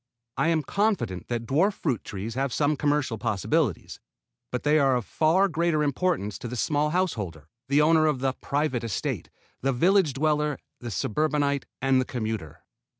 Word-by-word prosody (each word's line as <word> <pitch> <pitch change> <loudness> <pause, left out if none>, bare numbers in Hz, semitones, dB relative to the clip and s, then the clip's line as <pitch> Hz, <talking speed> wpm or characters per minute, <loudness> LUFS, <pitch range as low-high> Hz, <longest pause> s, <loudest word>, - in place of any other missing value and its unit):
I - - +1
am 165 -2 +2
confident 195 - -1
that 120 -1 -3
dwarf 170 - +2
fruit 135 - -2
trees 105 +3 -5
have 135 +2 -1
some 145 +4 +1
commercial 145 -5 0
possibilities, 110 - -1 0.5
but 125 - -3
they 150 +2 +4
are 135 -2 +3
of 120 -4 -2
far 165 - +3
greater 165 -3 +1
importance 140 - -1
to - - -6
the 125 - -5
small 150 +5 +1
householder, 105 - -2 0.2
the 145 +2 +4
owner 155 0 +4
of 150 -3 +1
the 130 +1 0
private 140 -4 -1
"estate," 115 -3 -3 0.3
the 135 - +1
village 175 +3 +3
dweller, 150 0 +1 0.2
the 120 - -6
suburbanite 140 - 0 0.2
and 135 -1 +4
the - - -2
commuter. 110 - -4
140 Hz, 165 wpm, -26 LUFS, 120-155 Hz, 0.5 s, they